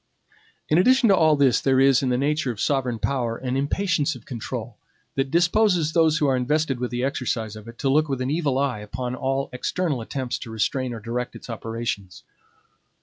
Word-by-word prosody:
In 155 - +3
addition 255 +4 +5
to 195 - +6
all 160 -3 +4
this, 140 -3 +3
there 135 -1 +3
is, 135 -1 +5
in 130 - 0
the 125 - +1
nature 150 +1 0
of 115 - -4
sovereign 130 -4 0
power, 120 -1 -1
an 130 0 -3
impatience 150 +1 0
of 120 - -13
control, 120 -1 -6 0.4
that 135 0 -1
disposes 175 -1 +2
those 160 -2 +4
who 150 - +1
are 135 -2 +3
invested 135 +1 0
with 125 0 -2
the 120 +1 -3
exercise 120 -5 -2
of 110 +1 -11
it, 115 0 -11
to - - -2
look 150 +3 +3
with 135 -2 -1
an 130 +1 -1
evil 150 -4 0
eye 135 -5 0
upon 125 +4 -5
all 135 +1 -2
external 145 +1 -1
attempts 125 +2 -4
to 120 - -8
restrain 125 +3 -1
or 115 - -5
direct 120 +3 -4
its - - -9
operations. 115 -4 -5
135 Hz, 205 wpm, -24 LUFS, 120-150 Hz, 0.4 s, to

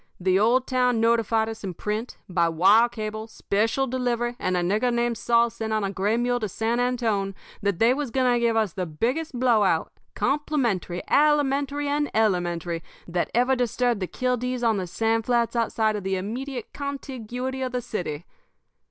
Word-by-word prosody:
The 185 +1 +2
old 245 +5 +3
town 250 -2 +1
notified 225 -1 +2
us 225 -1 -7
in 185 -3 -4
print, 215 +6 -4
by 170 -2 +1
wire 195 +8 +5
cable, 215 -1 -5
special 225 +4 0
delivery, 240 -2 -1
and 185 -1 0
a - - +1
nigger 215 +7 +1
named 240 0 0
Saul 235 0 +3
sent 220 -1 -5
on 215 -1 0
a 195 - -1
gray 200 +3 0
mule 245 0 +1
to 215 -3 -3
San 225 +5 -1
Antone, 225 -6 0 0.3
that 200 -3 0
they 230 +5 +4
was 285 -1 -3
going 255 0 +2
to 240 - +2
give 235 -1 +2
us 215 -6 +1
the 185 -2 -3
biggest 250 - -2
blow 240 -4 +4
out, 175 -5 +1 0.2
complimentary, 250 - -1
alimentary, 285 -1 +2
and 290 +1 0
elementary, 175 -5 0 0.3
that 175 0 -1
ever 250 +2 +3
disturbed 245 -2 0
the 185 - -1
kildees 250 +1 -2
on 220 -2 +2
the 185 -2 -3
sand 225 +4 0
flats 240 -1 +1
outside 220 -2 +1
of 205 - -4
the 190 0 -1
immediate 240 +6 -5
contiguity 260 -2 -5
of 255 -1 -2
the 250 - -1
city. 180 -9 -5
230 Hz, 180 wpm, -25 LUFS, 200-250 Hz, 0.3 s, wire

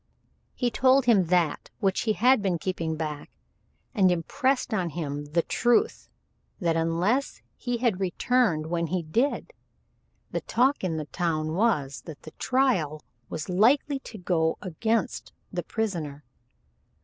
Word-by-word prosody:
He 245 -2 0
told 260 +2 +4
him 215 -7 +5
that 170 -2 +1
which 195 -3 +1
he - - +4
had 245 +5 +4
been 190 -4 0
keeping 165 -2 -2
back, 155 -2 -5 0.6
and 195 -6 +4
impressed 255 - 0
on 185 -5 0
him 145 -3 -4
the 160 +3 0
truth 240 - +1 0.5
that 170 -4 +1
unless 170 +11 0
he 245 -1 -2
had 230 -6 +1
returned 190 -2 +1
when 170 +1 -1
he 180 +1 -1
did, 240 - -1 0.8
the - - -2
talk 260 +2 +1
in 165 -4 -1
the 155 - -3
town 155 -2 -1
was 150 - +1
that 155 -3 -10
the 155 - -10
trial 205 - +1 0.3
was 155 - -5
likely 255 +9 +3
to 235 - -10
go 165 -3 0
against 220 +5 -1 0.2
the - - -1
prisoner. 165 -10 -3
185 Hz, 140 wpm, -27 LUFS, 160-240 Hz, 0.8 s, him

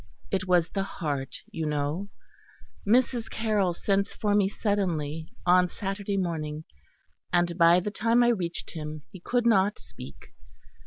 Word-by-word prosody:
It 190 -2 -1
was 175 -2 +3
the 195 - -2
heart, 145 -8 -4 0.2
you 160 -1 -3
know. 150 +6 -2 0.8
Mrs. 240 +1 +2
Carroll 210 -5 +1
sent 195 +3 0
for 210 -1 -1
me 200 -2 +3
suddenly, 165 -8 -2
on 180 0 +5
Saturday 195 +2 -3
morning; 155 -4 -2 0.7
and 175 -1 +2
by 170 0 +6
the 205 +3 -3
time 230 +3 +3
I 240 - +4
reached 180 -7 -2
him 155 -2 -6
he 185 - -10
could 240 +6 0
not 205 -3 +3
speak. 70 +2 -12
185 Hz, 145 wpm, -27 LUFS, 160-205 Hz, 0.8 s, by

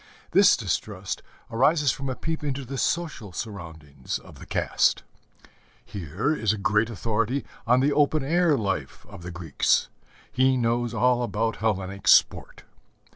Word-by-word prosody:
This - - +6
distrust - - -3 0.3
arises 140 +4 +3
from 135 +2 -5
a 130 - -3
peep 160 +2 -4
into 140 -2 -3
the 135 +1 -5
social 155 - -2
surroundings 80 - -6
of - - -15
the - - -12
caste. - - +1 0.8
Here 100 - -2
is 110 -9 +1
a 110 - -2
great 105 +2 +1
authority 115 +4 -1 0.2
on 125 +2 +4
the 145 +2 +2
open 150 0 +2
air 165 +1 +2
life 95 -10 -3
of - - -11
the 90 - -7
Greeks: 85 -4 0 0.4
he 130 0 +3
knows 120 -1 0
all 125 0 +3
about 115 -1 -1
Hellenic 100 -2 -2
sport. - - +3
115 Hz, 145 wpm, -25 LUFS, 100-135 Hz, 0.8 s, This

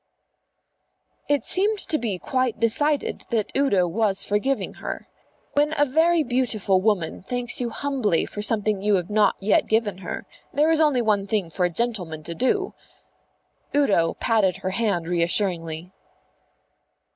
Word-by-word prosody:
It 290 -1 +2
seemed 415 +3 +1
to 310 -6 -1
be 215 -6 -2
quite 255 +3 -1
decided 285 +6 +1
that 220 -3 -1
Udo 205 -11 +3
was 200 +2 0
forgiving 230 +7 -1
her. - - -5 0.5
When 295 +2 +2
a 290 - +5
very 320 +4 +3
beautiful 235 -7 0
woman 190 -6 0
thanks 245 +5 -1
you 240 - -1
humbly 240 -8 0
for 205 - -6
something 210 -2 +1
you 205 0 +3
have 180 +1 -2
not 210 0 +3
yet 200 +2 +2
given 220 -4 0
her, 185 - -6 0.3
there 305 +3 +2
is 320 -1 +3
only 285 -6 +3
one 205 -2 +1
thing 195 -5 -1
for 180 +3 0
a - - +1
gentleman 180 -6 -3
to 170 - -5
do. 385 - 0 1.0
Udo 200 -13 +2
patted 215 -6 +1
her 185 - -3
hand 195 -5 -1
reassuringly. 170 -1 0
215 Hz, 145 wpm, -24 LUFS, 185-260 Hz, 1.0 s, a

